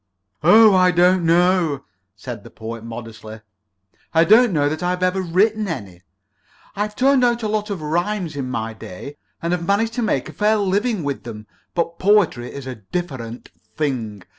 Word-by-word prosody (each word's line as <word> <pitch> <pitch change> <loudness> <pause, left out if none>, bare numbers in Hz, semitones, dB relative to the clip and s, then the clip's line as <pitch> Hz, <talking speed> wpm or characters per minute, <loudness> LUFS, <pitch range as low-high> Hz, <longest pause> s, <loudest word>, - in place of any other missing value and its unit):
"Oh, 210 +6 +7
I 185 -1 +5
don't 180 +1 +3
know," 170 -4 +2 0.3
said 95 - -8
the - - -12
Poet, 115 0 -8
modestly. 110 -1 -9 0.7
"I 165 - +6
don't 225 +5 +5
know 145 -4 +1
that 155 +3 -3
I've 180 +1 -1
ever 185 +1 +1
written 205 +5 +1
any. 100 - -6 0.7
I've 210 +1 -3
turned 265 +1 +3
out 240 -1 +1
a - - 0
lot 210 0 -2
of 190 -6 -4
rhymes 175 +1 -2
in 135 -3 -4
my 115 -2 -3
day, 110 +7 -10 0.3
and 170 +1 0
have 170 -1 -3
managed 225 +3 +1
to 245 - -2
make 220 - 0
a - - -10
fair 215 +1 +2
living 205 0 0
with 140 -1 -3
them, 110 -2 -9 0.3
but 170 -1 -2
poetry 185 -12 +2
is 140 -2 -8
a 130 - -5
different 125 - -6 0.3
thing. 115 -10 -3
175 Hz, 175 wpm, -21 LUFS, 130-205 Hz, 0.7 s, Oh